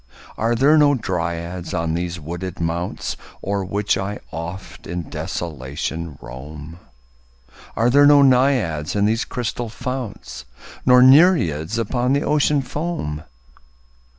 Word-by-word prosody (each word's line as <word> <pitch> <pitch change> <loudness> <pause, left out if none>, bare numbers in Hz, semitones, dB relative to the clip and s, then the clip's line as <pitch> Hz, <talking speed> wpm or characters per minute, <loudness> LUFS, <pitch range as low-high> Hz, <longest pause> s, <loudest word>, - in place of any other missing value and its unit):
Are 115 +2 0
there 145 +6 +5
no 145 -1 +5
Dryads 85 -3 -3
on 80 -1 -1
these 85 0 -3
wooded 85 +4 -6
mounts 85 +1 -3 0.3
O'er 100 0 -1
which 100 +1 0
I 100 +2 -3
oft 85 +4 -7
in 85 -2 -5
desolation 75 0 -5
roam? 75 +6 -10 1.0
Are 115 - +2
there 145 +2 +6
no 145 -1 +7
Naiads 125 - +2
in 100 0 +2
these 110 +2 +1
crystal 120 -1 -4
founts? 125 - -6 0.4
Nor 125 0 +7
Nereids 130 - +4
upon 120 +3 0
the 140 +2 +1
Ocean 150 -1 +2
foam? 145 - -4
100 Hz, 125 wpm, -21 LUFS, 85-125 Hz, 1.0 s, no